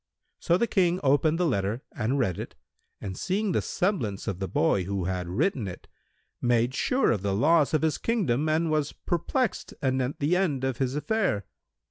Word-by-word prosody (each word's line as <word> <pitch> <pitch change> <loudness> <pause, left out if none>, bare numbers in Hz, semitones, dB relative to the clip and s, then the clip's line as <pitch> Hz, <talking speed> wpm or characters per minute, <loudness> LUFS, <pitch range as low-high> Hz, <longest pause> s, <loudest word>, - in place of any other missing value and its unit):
So 170 - +2
the 235 - +2
King 180 -5 +2
opened 145 +3 +3
the 180 - +1
letter 110 - -1
and 120 +6 0
read 95 -10 0
it - - -7 0.4
and 95 -2 -5
seeing 200 - -1
the - - +1
semblance 125 - -1
of 95 -4 -2
the 95 - -2
boy 105 - +1
who 95 -1 -2
had 90 -1 -2
written 120 - 0
it, 90 - -9 0.5
made 120 0 +2
sure 255 - +2
of 105 - 0
the 100 -1 0
loss 155 +7 +3
of 155 - +1
his 160 -1 +1
kingdom 155 - 0
and 160 +1 +1
was 150 -2 0
perplexed 215 - -2
anent 130 -1 0
the 150 +5 +2
end 160 -9 0
of 130 -2 -1
his 130 0 0
affair. 150 - 0
140 Hz, 185 wpm, -27 LUFS, 105-170 Hz, 0.5 s, opened